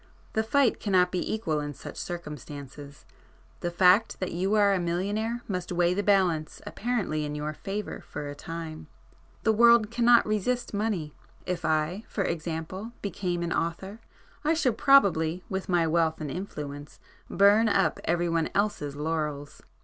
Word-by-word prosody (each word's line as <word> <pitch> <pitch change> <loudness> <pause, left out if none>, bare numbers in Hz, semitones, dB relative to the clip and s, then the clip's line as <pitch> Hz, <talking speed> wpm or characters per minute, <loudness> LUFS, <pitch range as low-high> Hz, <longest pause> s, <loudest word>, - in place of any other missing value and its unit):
The 220 - +2
fight 240 +2 +2
cannot 185 -3 +2
be 180 - -2
equal 165 -9 -1
in 145 -1 -5
such - - -9
circumstances. 145 -4 -8 0.5
The 175 - -2
fact 180 +5 +4
that 185 - -3
you 190 +5 0
are 205 -1 +4
a 190 - +1
millionaire 205 +7 -2
must 180 -3 -4
weigh 175 0 +2
the 200 - 0
balance 180 -6 +1
apparently 210 -10 -2
in 150 0 -4
your 150 +1 -3
favour 200 +6 -5
for 145 0 -5
a 145 - -5
time. 160 +1 -7 0.6
The 220 - +4
world 235 -1 +5
cannot 240 0 +5
resist 215 +4 -1
money. 200 -8 -2 0.3
If 180 -2 -3
I, 155 +6 0
for 200 - -2
example, 170 +6 -4
became 180 -3 -2
an 170 - -1
author, 190 +6 -3 0.4
I 315 +2 +2
should 260 -8 +1
probably 185 - +4
with 190 -1 -4
my 175 -2 +3
wealth 160 0 +1
and 150 -3 -4
influence, 145 -6 -7 0.3
burn 205 +3 +5
up 195 - +2
every 175 +1 +1
one 165 -1 0
else's 200 -9 -1
laurels. 150 -2 -3
180 Hz, 155 wpm, -27 LUFS, 160-210 Hz, 0.6 s, world